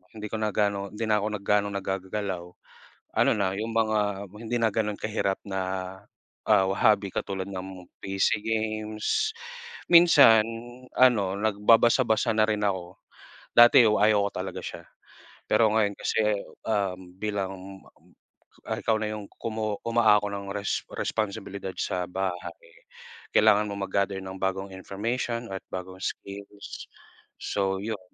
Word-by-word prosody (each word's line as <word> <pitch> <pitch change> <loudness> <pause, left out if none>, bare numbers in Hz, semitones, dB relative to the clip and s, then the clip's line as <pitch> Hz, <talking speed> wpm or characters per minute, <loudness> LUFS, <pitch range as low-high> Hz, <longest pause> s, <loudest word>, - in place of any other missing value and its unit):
Hindi 105 0 -6
ko 110 - -2
na 105 -1 0
gaano, 100 -1 0
hindi 105 +2 -5
na 105 -1 +3
'ko 105 - -2
nagganong 100 0 0
naggagagalaw. 95 -1 -3 0.7
Ano - - +4
na 95 -2 0
yung 110 +2 -3
mga 105 -3 0 0.2
hindi 120 +2 -2
na 115 - +3
ganun 105 -1 -1
kahirap 105 -3 -1
na, 95 -1 -3 0.9
ah, 95 0 +5
hobby 100 0 +3
katulad 95 -1 -3
ng 95 -1 -8 0.2
PC 95 +2 0
games, 110 - -1 0.6
minsan 145 -10 +8 0.5
ano 105 -7 +4
nagbabasa-basa 110 +2 +3
na 110 - +5
rin 105 -1 0
ako. 95 -3 -2 0.6
Dati 120 +1 +9
yo 105 -1 +4
ayoko 105 -1 +4
talaga - - -4
siya. - - -7 0.7
Pero 110 -2 +4
ngayon 105 -2 +2
kasi, 110 - 0 0.5
um, 100 -4 0 0.2
bilang, 100 -2 -2 1.1
ah, - - -2
ikaw 110 - +1
na 105 -1 -2
yung 105 -1 -6
kumu 110 -2 -3
umaako 110 -3 +3
ng 100 -1 -5
res 100 0 -2
responsibilidad 100 -3 -3
sa 90 -1 -1
bahay. 90 -2 -3
Eh 85 0 -20 0.5
kailangan 105 -1 +5
mong 100 -1 -4
mag-gather 100 0 -1
ng 95 0 -7
bagong 95 0 -2
information 115 +5 -3
at 95 - -3
bagong 95 0 -7
skills. 100 +1 -7 0.5
So 95 -1 -1
yun. 110 -2 -3
105 Hz, 135 wpm, -26 LUFS, 95-110 Hz, 1.1 s, Dati